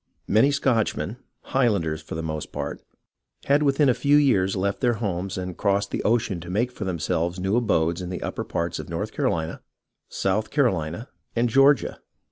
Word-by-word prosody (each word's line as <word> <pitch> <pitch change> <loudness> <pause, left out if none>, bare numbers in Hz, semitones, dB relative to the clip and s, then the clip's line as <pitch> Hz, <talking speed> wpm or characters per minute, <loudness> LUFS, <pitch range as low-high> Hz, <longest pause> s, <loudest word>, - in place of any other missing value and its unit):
Many 110 +7 +4
Scotchmen, 125 -5 0 0.2
Highlanders 100 -12 0
for 80 - -7
the 80 - -3
most 80 -1 -4
part, - - -5 0.6
had 140 +2 +3
within 140 0 +3
a 130 - +5
few 145 +4 +3
years 100 -10 +3
left 100 +1 -1
their 120 -2 +2
homes 100 -3 -3
and 90 -1 -4
crossed 100 0 0
the - - -2
ocean 110 -5 +1
to 85 +1 -9
make 115 +7 0
for 105 - -6
themselves 85 0 -1
new 95 +3 0
abodes 85 -8 +1
in 90 - -5
the 90 - -5
upper - - -3
parts 85 0 -3
of - - -7
North - - -3
Carolina, 80 -1 -1 0.5
South 105 +3 -1
Carohna, 105 - 0 0.3
and 120 +1 +2
Georgia. 135 +3 +4
100 Hz, 175 wpm, -24 LUFS, 85-125 Hz, 0.6 s, a